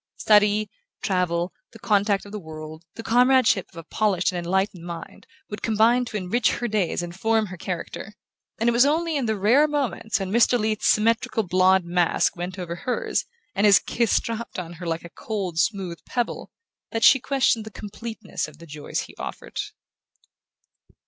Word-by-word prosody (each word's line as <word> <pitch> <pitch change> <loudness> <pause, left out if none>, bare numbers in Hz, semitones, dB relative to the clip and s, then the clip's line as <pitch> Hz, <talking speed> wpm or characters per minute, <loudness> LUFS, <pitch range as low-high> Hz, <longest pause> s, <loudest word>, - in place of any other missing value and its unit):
Study, 210 0 +4 0.4
travel, 180 -2 0 0.2
the - - -11
contact 205 -2 +1
of 200 - -11
the 210 - -5
world, 155 -1 -9
the 225 - -7
comradeship 245 -4 +4
of - - -17
a 165 - -7
polished 195 0 0
and 180 - -3
enlightened 185 0 -1
mind, 170 -1 -9 0.2
would 210 - -6
combine 230 +3 +3
to 215 - -4
enrich 205 +4 +1
her 240 - -2
days 205 -5 0
and 175 0 -6
form 220 +4 +1
her 185 -2 -8
character; 185 +4 -6 0.4
and 230 - +1
it - - +5
was 235 +1 +5
only 320 +3 +1
in 270 -5 0
the 220 - +1
rare 240 +10 +4
moments 275 -7 -1
when 190 -1 -3
Mr. 235 +2 +4
Leath's 215 -1 0
symmetrical 230 +1 +2
blond 185 0 +3
mask 175 0 +2
bent 180 +2 -5
over 175 -2 -5
hers, 250 - -1 0.3
and 200 +2 +3
his 200 - +8
kiss 235 -2 +1
dropped 230 0 -5
on 175 -2 -5
her 175 - -5
like 165 0 -2
a - - -9
cold 190 -7 -4
smooth 185 -2 -1
pebble, 240 -2 -3 0.4
that 225 -1 -2
she 270 - +7
questioned 255 -4 +1
the 220 - -8
completeness 215 0 -6
of 150 -1 -14
the 170 - -13
joys 150 -2 -4
he - - -10
offered. - - -7
210 Hz, 180 wpm, -24 LUFS, 180-230 Hz, 0.4 s, his